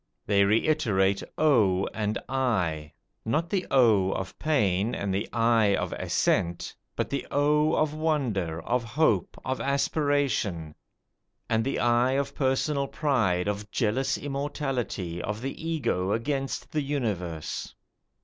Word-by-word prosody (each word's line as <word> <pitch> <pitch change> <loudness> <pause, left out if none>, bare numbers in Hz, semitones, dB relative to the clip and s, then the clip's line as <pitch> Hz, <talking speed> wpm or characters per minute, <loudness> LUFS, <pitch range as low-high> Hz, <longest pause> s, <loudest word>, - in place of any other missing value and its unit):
They 100 -1 +4
reiterate 105 -4 +2 0.2
O 105 -11 +3
and 105 -1 -1
I, 90 -13 -1 0.3
not 155 +9 -1
the 195 -3 0
O 110 -8 +4
of 95 -1 -5
pain 110 - +1
and 100 -1 -2
the 100 +3 -2
Ay 115 -3 +3
of - - -2
assent, 85 0 0 0.2
but - - -1
the 140 -2 -2
O 150 +2 +2
of 155 -1 +1
wonder, 120 - -1
of 125 0 0
hope, 115 - +1
of 130 0 -2
aspiration; 140 - 0 0.7
and 115 0 +1
the 135 - -1
I 120 +2 +3
of 140 0 -1
personal 140 +1 0
pride, 110 - +1
of 105 0 -3
jealous 130 +5 0
immortality, 135 - -3
of 105 +3 -3
the 135 +4 -5
Ego 120 - 0
against 135 +4 -2
the 155 - 0
Universe. 105 - -3
120 Hz, 130 wpm, -27 LUFS, 100-140 Hz, 0.7 s, They